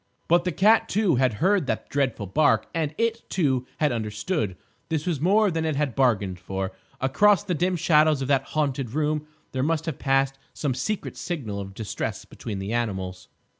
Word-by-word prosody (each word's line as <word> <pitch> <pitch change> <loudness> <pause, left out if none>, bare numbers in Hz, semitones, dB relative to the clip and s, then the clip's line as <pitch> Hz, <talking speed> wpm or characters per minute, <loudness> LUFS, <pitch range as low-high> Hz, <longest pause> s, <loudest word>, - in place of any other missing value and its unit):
But 175 +1 +4
the 180 - +1
cat, 215 +7 +4
too, 195 - +2
had 130 -2 +3
heard 185 - +2
that - - -2
dreadful 135 -7 -1
bark; 145 +11 +3
and 155 -2 -1
it, 230 0 -1
too, 130 -8 +1
had 150 -3 +2
understood. 105 - -2 0.3
This 160 -2 -1
was 165 -6 -1
more 205 +4 +4
than 165 -1 -1
it 160 -2 0
had 140 -3 0
bargained 105 -9 +1
for. 95 +1 -3 0.3
Across 195 +10 +4
the 180 - -1
dim 180 +3 +1
shadows 155 -3 +4
of - - -3
that 135 -2 +3 0.2
haunted 135 -5 -1
room 150 0 0 0.2
there 130 - -2
must 160 +2 0
have 160 -5 -4
passed 135 0 +1 0.2
some 140 -4 -1
secret 195 - -3
signal 125 - -4
of 95 -1 -7
distress 110 -1 -4
between 105 -3 -6
the 95 +3 -4
animals. 95 -6 -3
145 Hz, 185 wpm, -25 LUFS, 115-165 Hz, 0.3 s, But